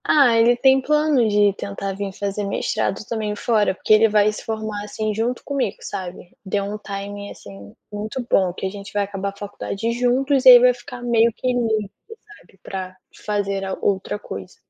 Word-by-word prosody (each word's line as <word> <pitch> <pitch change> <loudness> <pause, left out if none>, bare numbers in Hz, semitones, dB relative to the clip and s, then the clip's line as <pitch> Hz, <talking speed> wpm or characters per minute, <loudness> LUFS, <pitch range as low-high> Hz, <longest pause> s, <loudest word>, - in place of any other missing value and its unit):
Ah, 275 -6 +4
ele 230 +1 +5
tem 265 +1 +4
planos 300 -5 +2
de 205 -1 +4
tentar 200 0 -5
vim 195 0 -4
fazer 200 +1 -3
mestrado 200 +1 -2
também 215 -2 -3
fora, 210 -3 +1
porque 215 - +2
ele 220 +1 +6
vai 210 0 +3
se - - -8
formar 215 -2 -4
assim 215 +1 -3
junto 230 +4 -2
comigo, 260 -8 -2
sabe? 180 -1 -7
Deu 200 0 -1
um 205 +1 -4
timing 200 0 -6
assim 100 0 -12 0.2
muito 215 +5 -4
bom, 190 -5 +2
que 185 - -6
a - - 0
gente 200 0 -9
vai 205 0 +1
acabar 200 0 -4
a 200 - -12
faculdade 205 +2 -4
juntos 255 +3 +1
e - - +11
aí 245 -1 +11
vai 250 +1 +5
ficar 245 0 -10
meio 235 -1 +3
que - - -4
livre 220 -4 -1 0.4
sabe, 195 - -23
para 185 -1 -6 0.3
fazer 200 -2 -1
a 190 0 -4
outra 195 +1 -1
coisa. 95 - -9
210 Hz, 190 wpm, -21 LUFS, 200-235 Hz, 0.4 s, e